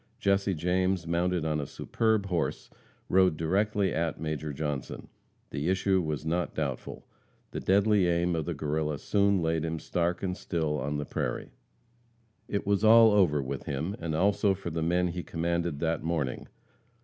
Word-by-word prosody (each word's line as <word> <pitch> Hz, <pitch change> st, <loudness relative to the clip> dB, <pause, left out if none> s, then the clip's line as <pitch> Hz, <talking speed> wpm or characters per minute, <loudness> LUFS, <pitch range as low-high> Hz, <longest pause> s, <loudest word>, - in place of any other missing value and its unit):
Jesse 100 Hz, -1 st, +1 dB
James, 90 Hz, +2 st, 0 dB
mounted 85 Hz, 0 st, 0 dB
on 75 Hz, -1 st, 0 dB
a 70 Hz, -, -5 dB
superb 110 Hz, -3 st, 0 dB
horse, 90 Hz, -4 st, -2 dB, 0.4 s
rode 95 Hz, -3 st, +3 dB
directly 95 Hz, +2 st, +1 dB
at 80 Hz, 0 st, -1 dB
Major 75 Hz, -1 st, -3 dB
Johnson. 75 Hz, -2 st, -4 dB, 0.4 s
The 75 Hz, +5 st, -2 dB
issue 95 Hz, 0 st, +2 dB
was 75 Hz, -2 st, -3 dB
not 85 Hz, +2 st, -1 dB
doubtful. 70 Hz, -5 st, -4 dB, 0.5 s
The -, -, -4 dB
deadly 100 Hz, -1 st, +3 dB
aim 85 Hz, 0 st, +1 dB
of 80 Hz, -2 st, -2 dB
the 85 Hz, -, -3 dB
Guerrilla 75 Hz, 0 st, -1 dB
soon 100 Hz, +2 st, +2 dB
laid 80 Hz, -1 st, 0 dB
him 80 Hz, 0 st, -2 dB
stark 85 Hz, +3 st, -1 dB
and 90 Hz, -1 st, -1 dB
still 80 Hz, -6 st, -2 dB
on 75 Hz, +2 st, -2 dB
the 75 Hz, -, -3 dB
prairie. -, -, -3 dB, 1.0 s
It 100 Hz, -, -2 dB
was 100 Hz, +1 st, +1 dB
all 115 Hz, 0 st, +8 dB
over 85 Hz, -9 st, +3 dB
with 65 Hz, 0 st, -5 dB
him, 75 Hz, +8 st, -2 dB
and 80 Hz, -2 st, -3 dB
also 100 Hz, +2 st, +2 dB
for 90 Hz, -3 st, -6 dB
the 80 Hz, +1 st, -2 dB
men 90 Hz, +2 st, +1 dB
he 90 Hz, +1 st, -4 dB
commanded 85 Hz, -2 st, -2 dB
that 80 Hz, -1 st, 0 dB
morning. 80 Hz, -6 st, -2 dB
85 Hz, 165 wpm, -29 LUFS, 80-95 Hz, 1.0 s, all